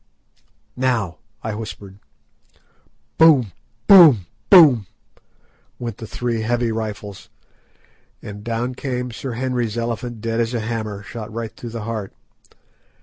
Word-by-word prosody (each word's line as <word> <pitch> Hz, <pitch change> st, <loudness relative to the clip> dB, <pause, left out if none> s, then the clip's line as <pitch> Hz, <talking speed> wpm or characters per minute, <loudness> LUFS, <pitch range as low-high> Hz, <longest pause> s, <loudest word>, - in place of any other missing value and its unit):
"Now," 120 Hz, -10 st, -1 dB, 0.3 s
I 110 Hz, -, -3 dB
whispered. 105 Hz, -2 st, -8 dB, 1.2 s
Boom! 145 Hz, -, +6 dB, 0.3 s
boom! 155 Hz, -, +8 dB, 0.2 s
boom! 145 Hz, -, +7 dB, 0.9 s
went 115 Hz, -4 st, -6 dB
the 115 Hz, -, -8 dB
three 120 Hz, -1 st, -2 dB
heavy 120 Hz, +1 st, 0 dB
rifles, 105 Hz, -2 st, -6 dB, 0.9 s
and 105 Hz, 0 st, -9 dB
down 120 Hz, +2 st, -2 dB
came 125 Hz, -1 st, -4 dB
Sir 125 Hz, +2 st, -6 dB
Henry's 120 Hz, -2 st, -2 dB
elephant 120 Hz, 0 st, -3 dB
dead 115 Hz, +1 st, -2 dB
as 115 Hz, +1 st, -1 dB
a -, -, 0 dB
hammer, 110 Hz, -3 st, -4 dB
shot 110 Hz, 0 st, -8 dB
right 115 Hz, 0 st, -6 dB
through 120 Hz, -, -8 dB
the 115 Hz, -1 st, -6 dB
heart. 110 Hz, -3 st, -5 dB
115 Hz, 120 wpm, -21 LUFS, 110-125 Hz, 1.2 s, boom